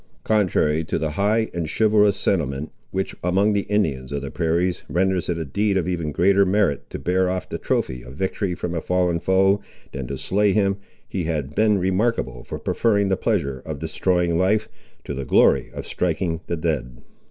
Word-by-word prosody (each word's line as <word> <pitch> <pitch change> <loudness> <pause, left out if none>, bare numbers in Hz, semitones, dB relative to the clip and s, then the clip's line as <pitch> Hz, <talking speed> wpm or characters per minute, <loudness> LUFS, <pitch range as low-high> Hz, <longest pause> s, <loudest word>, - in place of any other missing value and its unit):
Contrary 90 -7 +2
to - - -2
the 80 -1 -1
high 105 +6 +1
and 85 -2 -3
chivalrous 105 0 +3
sentiment, 75 -5 -1 0.2
which 95 0 -2
among 95 +4 +2
the 100 -1 -1
Indians 75 -12 0
of 70 -1 -3
the 70 - -5
prairies 85 +2 0
renders 90 +3 +1
it 85 - 0
a 80 - -3
deed 100 +7 0
of 90 - 0
even 85 -4 -2
greater 95 +6 +4
merit 95 -5 +1
to - - -5
bear 90 +5 +1
off 90 0 -3
the - - -5
trophy 65 -1 -1
of 60 +2 -11
victory 95 +1 -2
from 85 0 -4
a 85 - -2
fallen 90 -1 +1
foe, 95 +3 +3 0.3
than 65 -2 -5
to 70 - -4
slay 100 +7 +1
him, 100 -1 +2 0.3
he 90 -4 -3
had 75 -4 -2
been 105 +1 +3
remarkable 95 - 0
for - - -6
preferring 100 -3 +1
the 95 - +3
pleasure 85 - -1
of 80 -2 -5
destroying 85 +2 0
life, 105 +4 +2 0.4
to - - -5
the 70 0 -4
glory - - +4
of - - -7
striking 85 -1 -1
the 85 - -2
dead. 70 -7 -3
90 Hz, 190 wpm, -23 LUFS, 80-100 Hz, 0.4 s, greater